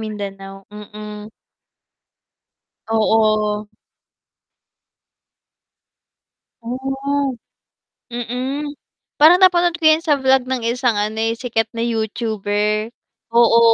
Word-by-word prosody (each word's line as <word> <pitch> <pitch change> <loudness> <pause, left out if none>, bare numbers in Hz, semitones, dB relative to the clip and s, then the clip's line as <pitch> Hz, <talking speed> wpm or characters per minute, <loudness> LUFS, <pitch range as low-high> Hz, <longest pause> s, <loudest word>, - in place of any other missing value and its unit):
Mindanao, 195 -2 -7
mm. 210 0 -9 1.6
Oo. 215 -1 +2 3.0
Ah, 270 +3 -2 0.8
mm 255 +5 -3 0.5
parang 325 +5 +7
napanood 350 -3 +4
ko 320 - 0
yan 315 +1 +5
sa 295 -4 +2
vlog 265 -1 +3
ng 245 -3 -2
isang, 235 -2 0
ano, 210 +1 -1
eh, 225 +1 -1
sikat 225 -3 -1
na 230 - -6
YouTuber, 215 -1 -1 0.4
oo 235 0 +5
230 Hz, 85 wpm, -19 LUFS, 210-265 Hz, 3.0 s, parang